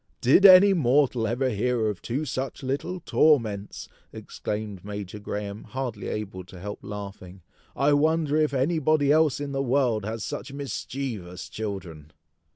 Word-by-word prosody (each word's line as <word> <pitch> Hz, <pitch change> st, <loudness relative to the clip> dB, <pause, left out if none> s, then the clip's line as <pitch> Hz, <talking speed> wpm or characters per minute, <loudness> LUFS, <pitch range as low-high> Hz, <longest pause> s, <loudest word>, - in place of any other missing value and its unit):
"Did 165 Hz, +11 st, +6 dB
any 195 Hz, +1 st, +8 dB
mortal 130 Hz, -6 st, +2 dB
ever 125 Hz, +3 st, 0 dB
hear 115 Hz, +2 st, 0 dB
of 105 Hz, -4 st, -3 dB
two 135 Hz, +6 st, -3 dB
such 135 Hz, 0 st, -4 dB
little 145 Hz, +8 st, -3 dB
torments!" 110 Hz, -13 st, +1 dB, 0.2 s
exclaimed 105 Hz, -3 st, -6 dB
Major 105 Hz, 0 st, -6 dB
Graham, 105 Hz, 0 st, -5 dB
hardly 125 Hz, -6 st, -5 dB
able 100 Hz, -3 st, -5 dB
to 95 Hz, -1 st, -12 dB
help 105 Hz, +3 st, -6 dB
laughing. 100 Hz, -3 st, -8 dB, 0.3 s
"I 145 Hz, +1 st, +3 dB
wonder 155 Hz, 0 st, +2 dB
if 155 Hz, -1 st, +2 dB
anybody 145 Hz, +1 st, +2 dB
else 155 Hz, -2 st, +3 dB
in 145 Hz, -1 st, -4 dB
the 135 Hz, 0 st, -1 dB
world 125 Hz, -5 st, +1 dB
has 110 Hz, +1 st, -4 dB
such 135 Hz, -, -5 dB
mischievous 130 Hz, -9 st, -5 dB
children!" 90 Hz, -8 st, -6 dB
125 Hz, 145 wpm, -26 LUFS, 105-145 Hz, 0.3 s, any